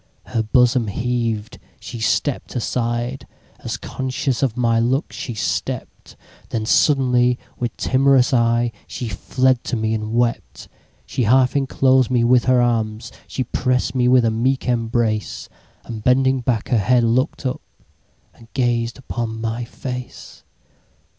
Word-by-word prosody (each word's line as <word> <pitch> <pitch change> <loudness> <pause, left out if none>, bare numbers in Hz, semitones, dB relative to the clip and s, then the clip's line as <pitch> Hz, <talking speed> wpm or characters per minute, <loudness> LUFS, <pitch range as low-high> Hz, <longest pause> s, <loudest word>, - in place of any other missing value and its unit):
Her 115 - -1
bosom 120 +1 +3
heaved—she 115 -2 -4
stepp'd 130 +5 -1
aside, 120 +1 -2 0.3
As - - -4
conscious 130 -1 -3
of 130 -4 0
my 115 -2 +2
look 130 +5 0
she 120 - -5
stept—Then 110 +1 -5
suddenly, 125 -2 +3 0.2
with 120 -2 -3
timorous 135 +1 +3
eyeShe 120 -1 0
fled 130 +5 +1
to - - -2
me 110 -1 -1
and 110 0 -3
wept. 120 -1 -1 0.4
She 125 - -1
half 130 +4 +4
enclosed 130 -2 +3
me 125 -2 +2
with 120 0 +4
her 125 -1 +4
arms, 115 -1 -1 0.2
She 130 - -2
press'd 125 +1 0
me 125 -2 +2
with 125 -1 +5
a 115 - +2
meek 130 +5 0
embrace; 115 -3 -1 0.3
And 110 -2 -7
bending 130 +2 +3
back 120 -3 -1
her 120 - +3
head, 120 +4 +3
look'd 130 +6 0
up, 130 - -2 0.7
And 115 - -18
gazed 120 -2 0
upon 120 -3 -4
my 115 +1 -3
face. 125 +1 -8
120 Hz, 135 wpm, -20 LUFS, 115-130 Hz, 0.7 s, with